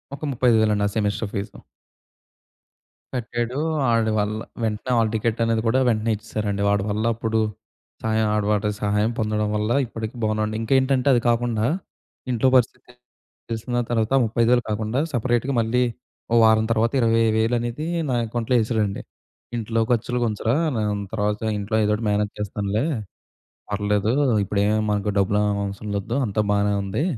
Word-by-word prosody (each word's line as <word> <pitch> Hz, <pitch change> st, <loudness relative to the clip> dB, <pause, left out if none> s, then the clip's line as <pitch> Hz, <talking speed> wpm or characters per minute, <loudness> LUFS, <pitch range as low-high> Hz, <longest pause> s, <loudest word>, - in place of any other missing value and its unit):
ఒక 145 Hz, -, -14 dB
ముప్పై 125 Hz, 0 st, 0 dB
ఐదు 110 Hz, -, +4 dB
వేలండి 105 Hz, -1 st, +2 dB
ఆ -, -, -1 dB
సెమెస్టర్ 105 Hz, 0 st, -1 dB
ఫీజు. 100 Hz, +1 st, -4 dB, 1.6 s
కట్టాడు. 120 Hz, +1 st, -3 dB, 0.3 s
ఆడి 115 Hz, -1 st, +2 dB
వల్ల 105 Hz, +1 st, -1 dB, 0.2 s
వెంటనే 110 Hz, +3 st, -2 dB
హాల్ 110 Hz, -2 st, +2 dB
టికెట్ 110 Hz, +1 st, 0 dB
అనేది 115 Hz, -1 st, +1 dB
కూడా 130 Hz, -, +3 dB
వెంటనే 115 Hz, -1 st, +1 dB
ఇచ్చేసారండి. 105 Hz, -1 st, -3 dB
వాడి 100 Hz, -1 st, +2 dB
వల్ల 105 Hz, +2 st, -1 dB
అప్పుడు 110 Hz, 0 st, -1 dB, 0.6 s
సాయం 110 Hz, 0 st, +1 dB
ఆడ 105 Hz, -, +1 dB
వాడి 105 Hz, 0 st, +1 dB
సహాయం 105 Hz, +2 st, +1 dB
పొందడం 105 Hz, -1 st, 0 dB
వల్ల 105 Hz, +2 st, -1 dB, 0.2 s
ఇప్పటికి 110 Hz, 0 st, -6 dB
బాగున్నాండి. 110 Hz, 0 st, 0 dB
ఇంకేంటంటే 130 Hz, +2 st, +2 dB
అది 120 Hz, -, +3 dB
కాకుండా 115 Hz, -2 st, +1 dB, 0.7 s
ఇంట్లో 125 Hz, +1 st, +2 dB
పరిస్థితి 125 Hz, 0 st, 0 dB, 0.6 s
తెలిసిన 115 Hz, +2 st, -3 dB
తర్వాత 115 Hz, +1 st, 0 dB
35,000 120 Hz, +2 st, +2 dB
కాకుండా 110 Hz, +4 st, -1 dB
సెపరేట్‌గా 120 Hz, +2 st, 0 dB
మళ్ళీ 120 Hz, +3 st, +1 dB, 0.5 s
ఓ -, -, +4 dB
వారం 110 Hz, 0 st, +5 dB
తర్వాత 115 Hz, +1 st, +1 dB
20,00 115 Hz, 0 st, +2 dB
అనేది 120 Hz, +7 st, -4 dB, 0.2 s
నా 125 Hz, -, 0 dB
అకౌంట్‌లో 120 Hz, +2 st, -1 dB
ఎశాడండి. 110 Hz, -3 st, -1 dB, 0.5 s
ఇంట్లో 115 Hz, 0 st, -1 dB
ఖర్చులు‌కు 120 Hz, +1 st, 0 dB
ఉంచరా 110 Hz, +2 st, 0 dB, 0.2 s
నేన్ 105 Hz, -2 st, -1 dB
తర్వాత 105 Hz, -1 st, -1 dB, 0.2 s
ఇంట్లో 105 Hz, +2 st, -2 dB
ఏదోకటి 105 Hz, +2 st, 0 dB
మేనేజ్ 105 Hz, 0 st, 0 dB
చేస్తానులే 105 Hz, +3 st, -1 dB, 0.9 s
పర్లేదు. 105 Hz, +1 st, 0 dB, 0.3 s
ఇప్పుడే 100 Hz, +1 st, -1 dB
ఏమి 110 Hz, 0 st, +2 dB
మనకు 105 Hz, 0 st, 0 dB
డబ్బులు 100 Hz, +1 st, +2 dB
ఏం 105 Hz, -1 st, 0 dB
అవసరం 100 Hz, +1 st, -6 dB
వద్ధు 115 Hz, +4 st, -4 dB
అంతా 105 Hz, 0 st, 0 dB
బానే 100 Hz, 0 st, +2 dB
ఉంది. 100 Hz, +9 st, -2 dB
110 Hz, 150 wpm, -23 LUFS, 105-115 Hz, 1.6 s, వారం